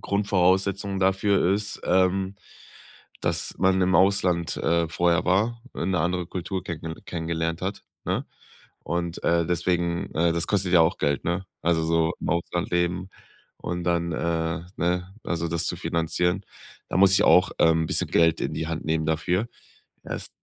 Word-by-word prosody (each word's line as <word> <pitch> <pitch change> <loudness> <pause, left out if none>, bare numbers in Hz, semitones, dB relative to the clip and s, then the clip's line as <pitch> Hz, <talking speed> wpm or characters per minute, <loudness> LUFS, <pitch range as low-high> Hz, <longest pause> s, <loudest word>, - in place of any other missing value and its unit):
Grundvoraussetzung 100 0 +1
dafür 95 0 +2
ist, 105 0 -4
ähm, 95 +1 +2 0.9
dass - - -2
man 95 +1 +3
im 90 0 +2
Ausland, 90 -2 +2
äh, 85 0 +1
vorher 85 +1 +1
war, 110 +6 +1
'ne 90 +1 -1
andere 90 +1 -1
Kultur 90 +1 -4
kennenge 80 -2 -6
kenngelernt 85 0 -3
hat, 95 +2 -3 0.2
ne? - - -1 0.6
Und, 85 +1 -3
äh, 85 0 +2
deswegen, 85 +1 -1
äh, 85 +1 +2
das 85 0 0
kostet 95 -3 0
ja 85 - +7
auch 80 +3 +2
Geld, 70 -1 0
ne? 85 +2 -1 0.2
Also, 85 -1 +1
so 80 +1 +1
im - - -3
Ausland 85 +2 -1
leben 85 +1 0 0.5
und 90 0 -4
dann, 85 -1 0
äh, 80 0 -1 0.2
ne, 90 +2 -1
also 85 -1 -2
das 85 0 -1
zu - - -2
finanzieren. 90 +3 -1 0.4
Da - - -1
muss 95 0 +6
ich - - +4
auch, 90 +1 +5
ähm, 80 0 +4
bisschen - - 0
Geld 80 -1 +3
in - - -2
die 80 - -3
Hand 80 -1 -4
nehmen 80 0 0
dafür. 90 +7 0 0.6
Es - - -5
85 Hz, 160 wpm, -25 LUFS, 85-95 Hz, 0.9 s, ja